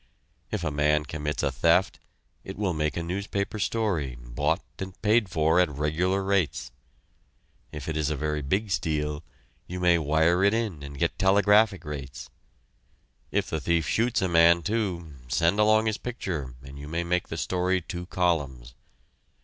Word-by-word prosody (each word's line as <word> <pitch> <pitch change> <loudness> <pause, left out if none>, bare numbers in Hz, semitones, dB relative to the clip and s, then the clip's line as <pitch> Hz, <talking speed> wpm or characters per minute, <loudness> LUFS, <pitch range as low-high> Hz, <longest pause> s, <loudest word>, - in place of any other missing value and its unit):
If 105 -5 -3
a 75 - -1
man 75 +1 +2
commits 75 -1 -3
a 70 - +1
theft, 85 +8 +2 0.4
it 95 - -8
will 100 -4 0
make 75 -1 -1
a 85 - -2
newspaper 100 +4 -3
story, 95 - -1
bought 70 +7 -1 0.2
and 95 -1 -7
paid 110 -1 +3
for 80 +1 +2
at 90 - +4
regular 80 +7 0
rates. 95 -5 0 1.0
If 75 -3 -7
it 80 - -2
is 75 -1 0
a 75 - -1
very 75 +1 -2
big 95 +9 -1
steal, 75 -3 -1 0.4
you 90 +1 -5
may 90 -1 +4
wire 80 +4 +2
it 100 +2 +4
in 105 -10 -2
and 70 0 -8
get - - -1
telegraphic 100 +1 +4
rates. 70 -4 -7 1.0
If - - -1
the 80 - -1
thief 85 -4 +1
shoots 115 - +1
a - - +2
man, 85 0 +5
too, 90 -6 -2
send 85 +10 +2
along 110 +1 +4
his 110 -1 -1
picture 85 - -4
and 70 +1 -10
you 70 - -8
may 85 +3 -2
make 90 +1 0
the - - -5
story 90 0 0
two 90 0 -7
columns. 70 -10 -1
85 Hz, 165 wpm, -27 LUFS, 75-95 Hz, 1.0 s, man